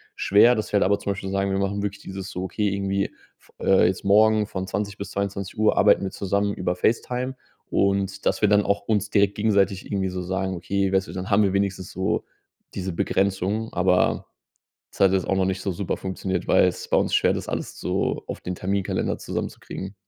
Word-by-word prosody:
schwer, 105 Hz, +5 st, +5 dB
dass 110 Hz, -, -3 dB
wir 105 Hz, -, +3 dB
halt -, -, +3 dB
einfach 100 Hz, +2 st, +2 dB
zum 100 Hz, -, -1 dB
Beispiel, 95 Hz, 0 st, -6 dB
sagen, 100 Hz, 0 st, 0 dB
wir 95 Hz, -, 0 dB
machen 100 Hz, +1 st, -1 dB
wirklich 100 Hz, 0 st, -4 dB
dieses: 95 Hz, 0 st, -6 dB
So 90 Hz, -, -4 dB
okay, 105 Hz, +2 st, -1 dB
irgendwie 100 Hz, 0 st, 0 dB, 0.3 s
f -, -, -25 dB
äh, 95 Hz, -, +4 dB
jetzt 95 Hz, -, -2 dB
morgen 110 Hz, +1 st, +5 dB
von 95 Hz, -2 st, -4 dB
20:00 100 Hz, 0 st, -3 dB
bis 100 Hz, -, -6 dB
22:00 100 Hz, +2 st, -1 dB
arbeiten -, -, +5 dB
wir 95 Hz, -, -3 dB
zusammen 100 Hz, +1 st, -1 dB
über 90 Hz, -2 st, -2 dB
Facetime 125 Hz, +6 st, -1 dB, 0.3 s
und 100 Hz, 0 st, 0 dB
dass -, -, +1 dB
wir 105 Hz, -, +4 dB
dann 105 Hz, 0 st, +4 dB
auch 100 Hz, 0 st, +1 dB
uns 105 Hz, -2 st, +1 dB
direkt 100 Hz, -1 st, +2 dB
gegenseitig 100 Hz, -3 st, +1 dB
irgendwie 95 Hz, -2 st, -1 dB
so 90 Hz, 0 st, -4 dB
sagen: 95 Hz, +1 st, -2 dB
„Okay“, 95 Hz, +2 st, -1 dB
weißt 95 Hz, 0 st, +2 dB
du, -, -, -8 dB
dann 95 Hz, +1 st, -5 dB
haben 105 Hz, +1 st, +5 dB
wir 95 Hz, -2 st, +1 dB
wenigstens 100 Hz, -2 st, -1 dB
so 95 Hz, +1 st, -1 dB, 0.5 s
diese 95 Hz, -1 st, -3 dB
Begrenzung, 100 Hz, +5 st, 0 dB
aber 90 Hz, 0 st, +2 dB, 0.6 s
das -, -, -16 dB
hat 95 Hz, -1 st, +5 dB
jetzt 95 Hz, -2 st, +1 dB
auch 95 Hz, -, +1 dB
noch 95 Hz, -1 st, +2 dB
nicht 95 Hz, 0 st, -2 dB
so 95 Hz, -, -1 dB
super 95 Hz, +2 st, -3 dB
funktioniert, 95 Hz, 0 st, -3 dB
weil‘s -, -, +2 dB
bei -, -, +3 dB
uns -, -, 0 dB
schwer -, -, +4 dB
ist, -, -, +1 dB
das -, -, -8 dB
alles -, -, -4 dB
so -, -, -1 dB
auf -, -, -6 dB
den 90 Hz, -, -4 dB
Terminkalender 95 Hz, +1 st, -1 dB
zusammenzukriegen. 95 Hz, +1 st, -5 dB
100 Hz, 210 wpm, -24 LUFS, 95-100 Hz, 0.6 s, schwer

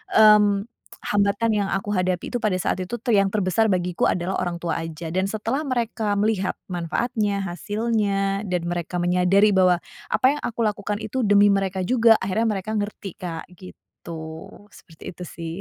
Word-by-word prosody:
mmm, 210 Hz, -2 st, +6 dB, 0.5 s
hambatan 205 Hz, +3 st, +2 dB
yang 200 Hz, -2 st, 0 dB
aku 195 Hz, +2 st, -2 dB
hadapi 185 Hz, -2 st, -1 dB
itu 245 Hz, -, 0 dB
pada 210 Hz, -4 st, +1 dB
saat 180 Hz, -, -1 dB
itu, 185 Hz, +6 st, -4 dB
tuh, 240 Hz, +2 st, -2 dB
yang 200 Hz, -1 st, +4 dB
terbesar 205 Hz, +1 st, +1 dB
bagiku 180 Hz, -1 st, 0 dB
adalah 180 Hz, +2 st, -1 dB
orang 175 Hz, -1 st, -2 dB
tua 170 Hz, -2 st, -2 dB
aja. 165 Hz, 0 st, -6 dB
Dan 190 Hz, +1 st, +1 dB
setelah 220 Hz, +6 st, -2 dB
mereka 230 Hz, -4 st, -1 dB
melihat 205 Hz, -3 st, 0 dB, 0.2 s
manfaatnya, 200 Hz, +4 st, -1 dB
hasilnya, 200 Hz, +1 st, -1 dB
dan 180 Hz, -2 st, -1 dB
mereka 175 Hz, 0 st, -3 dB
menyadari 180 Hz, +4 st, +3 dB
bahwa 185 Hz, -2 st, +4 dB, 0.3 s
apa -, -, +1 dB
yang 295 Hz, -, -7 dB
aku 235 Hz, 0 st, -2 dB
lakukan 210 Hz, 0 st, -2 dB
itu 235 Hz, +5 st, -2 dB
demi 205 Hz, 0 st, +6 dB
mereka 190 Hz, -1 st, -1 dB
juga, 230 Hz, 0 st, +5 dB
akhirnya 200 Hz, +4 st, 0 dB
mereka 215 Hz, +3 st, -6 dB
ngerti, 205 Hz, -3 st, -4 dB
Kak, 165 Hz, -3 st, -5 dB
gitu. 180 Hz, -2 st, -12 dB, 0.6 s
Seperti 160 Hz, -2 st, -16 dB
itu, 180 Hz, -, -9 dB
sih. 165 Hz, 0 st, -7 dB
195 Hz, 165 wpm, -23 LUFS, 180-215 Hz, 0.6 s, mmm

